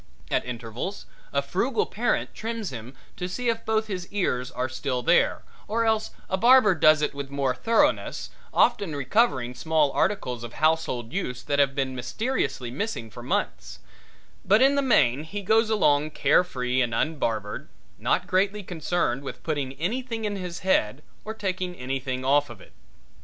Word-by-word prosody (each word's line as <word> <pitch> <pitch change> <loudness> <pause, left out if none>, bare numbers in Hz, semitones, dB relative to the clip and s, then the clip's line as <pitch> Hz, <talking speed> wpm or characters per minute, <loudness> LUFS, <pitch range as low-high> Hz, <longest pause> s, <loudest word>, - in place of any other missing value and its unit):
At - - +2
intervals 125 - -5 0.3
a - - +1
frugal 435 - 0
parent - - -1
trims 225 -5 -4
him 125 +2 -8 0.2
to 180 - -3
see 245 +6 -2
if 230 0 -1
both 220 0 +1
his 185 -4 -5
ears 125 -11 -1
are 125 +1 -2
still 130 -1 -3
there, - - +3 0.2
or 230 +2 0
else 220 -1 +1 0.2
a 190 - 0
barber 235 -1 +6
does 155 -2 +5
it - - 0
with 140 -1 -6
more 140 -2 0
thoroughness, 260 - +1 0.2
often 200 -10 +2
recovering 140 - +1
small 155 +1 +1
articles 125 - -1
of 120 - -7
household 155 -6 0
use 125 -10 -3
that 145 0 0
have 140 -1 +3
been 135 -2 -1
mysteriously 130 - -2
missing 140 - -4
for - - -9
months; - - -2 0.7
but 210 +3 +4
in 270 +2 +5
the 280 - +2
main 150 - +3
he 200 +6 -6
goes 220 +3 +3
along 150 -9 +3
carefree 135 -4 +2
and 115 -2 0
unbarbered, 115 -9 -2 0.3
not - - +1
greatly 200 +2 +1
concerned 165 -6 -1
with 140 - -8
putting 145 -4 -2
anything 225 - -3
in 205 -1 -2
his 180 -3 -6
head 145 - +1 0.2
or 220 +1 -6
taking 185 -3 -3
anything 130 -1 -3
off 145 +1 +3
of 120 -4 -10
it. - - -17
155 Hz, 165 wpm, -26 LUFS, 130-210 Hz, 0.7 s, barber